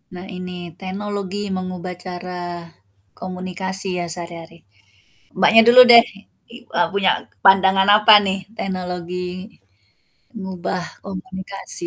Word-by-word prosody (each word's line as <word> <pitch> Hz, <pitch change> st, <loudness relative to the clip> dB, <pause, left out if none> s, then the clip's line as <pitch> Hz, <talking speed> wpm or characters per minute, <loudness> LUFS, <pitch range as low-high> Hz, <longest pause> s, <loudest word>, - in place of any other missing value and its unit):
Nah 180 Hz, -, -8 dB
ini 180 Hz, 0 st, -7 dB, 0.3 s
teknologi 200 Hz, 0 st, -5 dB, 0.2 s
mengubah 185 Hz, 0 st, -6 dB
cara 180 Hz, 0 st, -7 dB, 0.8 s
komunikasi 185 Hz, +1 st, -4 dB
ya 175 Hz, -, -2 dB
sehari-hari. 170 Hz, -1 st, -9 dB, 0.8 s
Mbaknya 220 Hz, +4 st, +6 dB
dulu 240 Hz, +1 st, +8 dB
deh, 235 Hz, 0 st, +9 dB, 0.5 s
i 235 Hz, -, -10 dB, 0.2 s
eee, 220 Hz, -, +2 dB
punya 200 Hz, -1 st, +2 dB, 0.3 s
pandangan 190 Hz, 0 st, +5 dB
apa 215 Hz, +1 st, +6 dB
nih 190 Hz, 0 st, -1 dB, 0.2 s
teknologi 180 Hz, -2 st, -5 dB, 1.2 s
mengubah 185 Hz, -3 st, -5 dB, 0.2 s
komunikasi. 190 Hz, -1 st, -3 dB
185 Hz, 100 wpm, -20 LUFS, 180-195 Hz, 1.2 s, deh